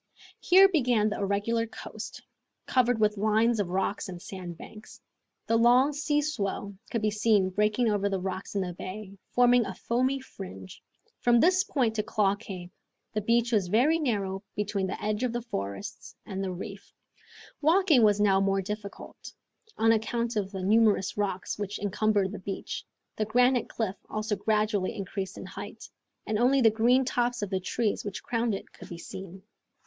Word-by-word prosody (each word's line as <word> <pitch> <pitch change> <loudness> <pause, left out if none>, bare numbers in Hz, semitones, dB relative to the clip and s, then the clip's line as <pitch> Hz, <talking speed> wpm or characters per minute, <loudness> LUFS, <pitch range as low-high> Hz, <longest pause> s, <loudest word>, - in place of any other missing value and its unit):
Here 380 +2 +7
began 245 - +2
the 210 - -3
irregular 205 +4 0
coast, - - -8 0.4
covered 245 -2 +2
with 210 -1 +2
lines 220 +2 +2
of 200 - 0
rocks 195 +2 -1
and 180 -1 -7
sandbanks. 185 +4 -9 0.5
The 230 - +2
long 250 +5 +5
sea 295 +1 0
swell 200 -8 -3 0.2
could 230 -3 -2
be 215 - +2
seen 210 -3 +2
breaking 210 +4 +1
over 205 -2 +1
the 195 -1 -1
rocks 190 +2 -5
in 200 - +1
the 180 -1 -3
bay, 195 +3 -8
forming 245 0 +4
a 195 -3 -6
foamy 255 +6 0
fringe. 95 - -10 0.4
From 240 -1 +4
this 365 +6 +4
point 240 -10 0
to - - +3
Claw 210 -3 +1
Cape 190 -4 -8 0.4
the 215 - 0
beach 235 +3 +2
was 205 -5 +2
very 255 - +3
narrow 200 -9 -1
between 205 -2 -1
the - - -4
edge 210 +1 -1
of 250 -2 0
the 240 - -2
forest 100 - -6
and 195 0 -4
the 190 - -2
reefs. 195 +2 -8 0.7
Walking 320 -3 +4
was 210 -2 +4
now 195 -2 +4
more 195 0 +1
difficult, 210 +1 -7 0.5
on 225 0 +4
account 230 +1 0
of 200 -3 -1
the 190 -2 -5
numerous 210 -1 +3
rocks 200 -1 -2
which 205 0 -3
encumbered 205 -1 +1
the 210 - -6
beach. 190 +1 -5 0.3
The 215 - 0
granite 245 +3 +3
cliff 215 -4 -3
also 215 0 -2
gradually 210 0 0
increased 195 -2 -5
in - - -7
height, - - -8 0.4
and 215 -1 -1
only 260 +3 +4
the 225 -4 +5
green 245 +4 +3
tops 245 -2 0
of 205 - -4
the 190 - 0
trees 210 +3 -1
which 205 -1 -6
crowned 230 -2 0
it - - -9
could - - -12
be 170 - -7
seen. 190 +2 -9
210 Hz, 175 wpm, -28 LUFS, 195-235 Hz, 0.7 s, Here